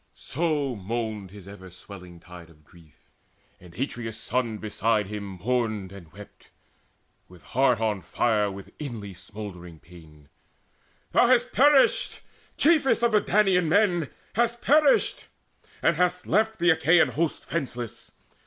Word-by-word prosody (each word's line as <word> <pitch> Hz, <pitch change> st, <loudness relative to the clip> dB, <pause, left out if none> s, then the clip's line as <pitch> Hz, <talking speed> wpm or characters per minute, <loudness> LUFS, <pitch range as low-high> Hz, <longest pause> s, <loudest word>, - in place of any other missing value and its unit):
So 145 Hz, -4 st, -2 dB
moaned 110 Hz, -1 st, -4 dB
his 100 Hz, -1 st, -13 dB
ever 100 Hz, -2 st, -11 dB
swelling 90 Hz, -1 st, -12 dB
tide 85 Hz, -1 st, -13 dB
of 75 Hz, -2 st, -22 dB
grief. 80 Hz, -1 st, -22 dB, 0.5 s
And 90 Hz, -2 st, -16 dB
Atreus' 115 Hz, -4 st, -4 dB
son 115 Hz, -1 st, -2 dB
beside 110 Hz, 0 st, 0 dB
him 105 Hz, +1 st, -6 dB, 0.2 s
mourned 110 Hz, -6 st, -1 dB
and 90 Hz, -5 st, -13 dB
wept 105 Hz, +1 st, -15 dB, 0.8 s
With 90 Hz, -1 st, -17 dB
heart 125 Hz, -2 st, +1 dB
on 110 Hz, -3 st, -1 dB
fire 105 Hz, +4 st, 0 dB
with 95 Hz, 0 st, -10 dB
inly 115 Hz, -9 st, -6 dB
smouldering 90 Hz, -3 st, -10 dB
pain: 75 Hz, -4 st, -17 dB, 0.8 s
"Thou 245 Hz, -, +4 dB
hast 245 Hz, 0 st, +3 dB
perished, 295 Hz, -, +3 dB, 0.4 s
chiefest 295 Hz, -6 st, +3 dB
of 235 Hz, -, +3 dB
the 210 Hz, -1 st, +4 dB
Danaan 190 Hz, -5 st, +2 dB
men, 175 Hz, -5 st, +2 dB, 0.2 s
Hast 235 Hz, +1 st, 0 dB
perished, 295 Hz, -1 st, +3 dB, 0.6 s
and 165 Hz, -, +3 dB
hast 180 Hz, 0 st, 0 dB
left 220 Hz, +2 st, +1 dB
the 175 Hz, -3 st, +4 dB
Achaean 165 Hz, +2 st, +4 dB
host 165 Hz, 0 st, -2 dB
Fenceless! 125 Hz, -7 st, -5 dB
115 Hz, 135 wpm, -25 LUFS, -, 0.8 s, Thou